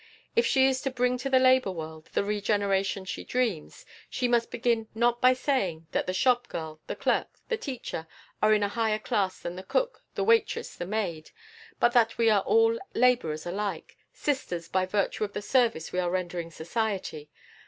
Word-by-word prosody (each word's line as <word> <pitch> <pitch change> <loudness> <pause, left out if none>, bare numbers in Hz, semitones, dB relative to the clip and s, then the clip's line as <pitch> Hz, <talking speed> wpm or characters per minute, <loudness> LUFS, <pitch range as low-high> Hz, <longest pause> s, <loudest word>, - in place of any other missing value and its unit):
If 470 +1 +4
she 265 -1 +4
is 265 -1 +2
to 270 - -1
bring 250 -1 0
to 275 - -3
the 265 - +5
labor 255 -4 +5
world 160 -3 -7
the - - +2
regeneration 200 -2 0
she 185 - -5
dreams, 245 - -2 0.2
she 250 - -1
must 240 -1 +2
begin 230 -2 0
not 240 +1 +2
by 255 0 +6
saying 195 - -1
that - - -1
the - - +1
shop 245 +5 +2
girl, 155 -1 -6
the - - -3
clerk, - - -1
the 465 - 0
teacher, 255 - -5 0.3
are 215 - +4
in 210 -1 +4
a - - +2
higher 220 0 0
class 195 -3 -1
than 175 - -5
the - - -5
cook, - - -1
the - - 0
waitress, 455 +2 +2
the 175 - -5
maid, 185 -7 -3 0.5
but 240 - +4
that 230 -2 +3
we 230 -1 +4
are 205 -2 +4
all 455 - +3 0.2
laborers 230 -12 +2
alike, 200 +3 -4 0.2
sisters 180 - -2
by 185 +1 0
virtue 200 +2 0
of 205 -1 -3
the - - -3
service 230 -9 +1
we 180 - -1
are 175 -1 0
rendering 175 -2 -3
society. 170 -3 -3
215 Hz, 190 wpm, -28 LUFS, 185-250 Hz, 0.5 s, by